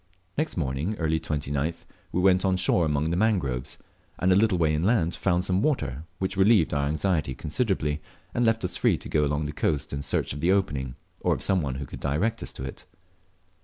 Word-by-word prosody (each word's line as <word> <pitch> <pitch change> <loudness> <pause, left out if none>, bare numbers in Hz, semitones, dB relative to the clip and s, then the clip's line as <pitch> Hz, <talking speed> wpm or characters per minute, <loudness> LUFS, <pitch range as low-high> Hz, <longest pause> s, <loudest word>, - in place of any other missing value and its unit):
Next 155 -5 -2
morning 75 +6 -1
early 80 -1 +1
(29th) 75 0 -2 0.3
we 90 - 0
went 95 -1 +4
on 95 -1 +2
shore 90 -1 +3
among 75 +1 0
the - - +1
mangroves, 85 - 0 0.4
and 90 - +2
a - - +6
little 100 -2 +3
way 80 -2 +2
inland 85 +1 +2
found 90 -1 +1
some 95 0 +2
water, 75 - -1
which 95 0 -2
relieved 95 -4 +4
our 70 -1 +1
anxiety 75 -2 0
considerably, 75 - -1 0.3
and 120 - +1
left 115 -3 +2
us 90 - -2
free - - +3
to - - -9
go 75 - +2
along 75 +1 0
the 75 - -3
coast 75 -1 -1
in 70 - -2
search - - -1
of 70 - -6
the 85 +5 +2
opening, 70 -10 0 0.2
or - - +1
of - - -6
some 95 -2 +3
one 70 -4 -2
who 70 +1 -4
could - - -9
direct 80 +11 0
us - - -5
to - - -7
it. 65 - -7
80 Hz, 210 wpm, -26 LUFS, 75-95 Hz, 0.4 s, a